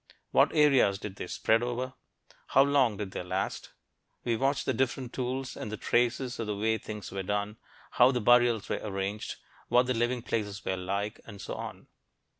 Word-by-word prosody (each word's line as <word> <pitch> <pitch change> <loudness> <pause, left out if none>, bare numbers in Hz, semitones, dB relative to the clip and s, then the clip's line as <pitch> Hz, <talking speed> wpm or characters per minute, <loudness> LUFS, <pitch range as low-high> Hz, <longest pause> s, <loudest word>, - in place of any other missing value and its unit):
What - - +5
areas 135 -10 +5
did 100 -1 -7
they - - -5
spread 110 +5 +2
over? 125 +1 -2 0.5
How 135 - +5
long 135 -7 +3
did 100 -3 -4
they - - -4
last? 95 +2 -3 0.5
We 120 -1 +1
watch 135 +4 0
the - - +1
different 130 -1 -1
tools 130 +1 -3
and 105 - -6
the 110 - -4
traces 125 +2 0
of 115 - -2
the 105 - -1
way 110 +2 +1
things 105 -1 -7
were 95 - -3
done 105 +2 -2 0.3
how 125 +1 +6
the 125 -2 +1
burials 120 -1 +4
were - - -2
arranged, 100 0 -3 0.3
what 125 +1 +5
the 130 - 0
living 120 +1 0
places 105 -5 -3
were 95 - 0
like, 100 +3 -3
and 100 -3 -10
so - - -5
on. - - -7
115 Hz, 190 wpm, -29 LUFS, 100-125 Hz, 0.5 s, how